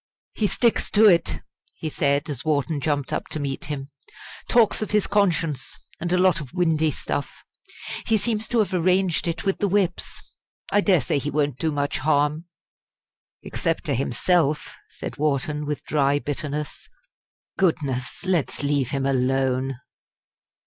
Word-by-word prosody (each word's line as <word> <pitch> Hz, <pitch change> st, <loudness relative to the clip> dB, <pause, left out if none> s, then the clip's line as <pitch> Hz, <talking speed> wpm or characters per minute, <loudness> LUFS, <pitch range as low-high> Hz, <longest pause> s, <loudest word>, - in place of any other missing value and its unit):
"He 215 Hz, -, +1 dB
sticks 235 Hz, +3 st, +1 dB
to 215 Hz, +1 st, +5 dB
it," 170 Hz, -5 st, +4 dB, 0.3 s
he 160 Hz, -, -5 dB
said, 145 Hz, 0 st, +1 dB
as 145 Hz, -3 st, -4 dB
Wharton 150 Hz, -1 st, 0 dB
jumped 145 Hz, -3 st, -1 dB
up -, -, -2 dB
to 155 Hz, -, -5 dB
meet 140 Hz, -2 st, -3 dB
him. 145 Hz, -1 st, -5 dB, 0.6 s
"Talks 230 Hz, -3 st, +4 dB
of 215 Hz, -, -2 dB
his 210 Hz, -1 st, +2 dB
conscience 175 Hz, -8 st, 0 dB, 0.2 s
and 175 Hz, +1 st, -3 dB
a 180 Hz, -, +3 dB
lot 180 Hz, -2 st, +4 dB
of 140 Hz, -1 st, -10 dB
windy 160 Hz, -3 st, +2 dB
stuff. 145 Hz, -1 st, -4 dB, 0.6 s
He 225 Hz, -, +4 dB
seems 220 Hz, +1 st, -1 dB
to 240 Hz, -, 0 dB
have 210 Hz, -4 st, +1 dB
arranged 180 Hz, 0 st, +2 dB
it 165 Hz, +1 st, -3 dB
with 195 Hz, -, 0 dB
the 205 Hz, -, +2 dB
Whips. 195 Hz, -2 st, 0 dB, 0.5 s
I 205 Hz, -, +4 dB
dare 185 Hz, -6 st, +4 dB
say 145 Hz, -, 0 dB
he 145 Hz, -, -3 dB
won't 145 Hz, -3 st, 0 dB
do 160 Hz, -, 0 dB
much 145 Hz, -1 st, -1 dB
harm." 150 Hz, +3 st, +1 dB, 1.0 s
"Except -, -, -2 dB
to -, -, -1 dB
himself," 150 Hz, +5 st, +1 dB, 0.2 s
said -, -, -7 dB
Wharton, 150 Hz, 0 st, 0 dB
with 150 Hz, -1 st, -3 dB
dry 145 Hz, -1 st, +2 dB
bitterness. 145 Hz, 0 st, -4 dB, 0.7 s
"Goodness! 145 Hz, -5 st, -1 dB
let's 175 Hz, -6 st, 0 dB
leave 140 Hz, -3 st, +1 dB
him 135 Hz, -1 st, -1 dB
alone!" 130 Hz, -1 st, 0 dB
150 Hz, 155 wpm, -24 LUFS, 140-180 Hz, 1.0 s, to